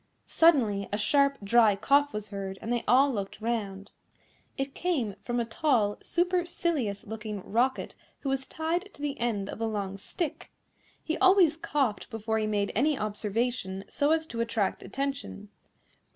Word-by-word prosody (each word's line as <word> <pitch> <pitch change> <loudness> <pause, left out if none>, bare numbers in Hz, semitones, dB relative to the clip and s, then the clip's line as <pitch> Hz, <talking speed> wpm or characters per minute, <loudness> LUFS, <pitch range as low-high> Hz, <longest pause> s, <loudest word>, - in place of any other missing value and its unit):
Suddenly, 230 -12 +3
a 205 - 0
sharp, 280 +6 +3
dry 220 0 +5
cough 285 +7 +3
was 210 -3 -6
heard, 195 -1 -5
and 230 - -2
they 240 - -1
all 265 +4 +5
looked 200 -2 -4
round. 210 -4 -3 0.7
It 270 0 -3
came 275 - -1
from 240 0 -1
a 235 - 0
tall, 225 -4 +1
supercilious 340 - 0
looking 215 -2 -6
Rocket, 245 +5 0 0.3
who 275 - -2
was 270 0 -1
tied 345 +5 -2
to - - -10
the 285 -1 -2
end 220 -5 -1
of 215 - -7
a 225 - +1
long 200 -3 -3
stick. 315 - -4 0.5
He 320 - -2
always 370 -5 +6
coughed 275 -9 -1
before 220 -1 -2
he 215 - 0
made 205 -1 0
any 285 +6 +2
observation, 210 -2 -2
so 285 - +1
as 320 0 +2
to 235 -6 -4
attract 225 -4 -1
attention. 275 -7 -4
235 Hz, 160 wpm, -28 LUFS, 210-285 Hz, 0.7 s, always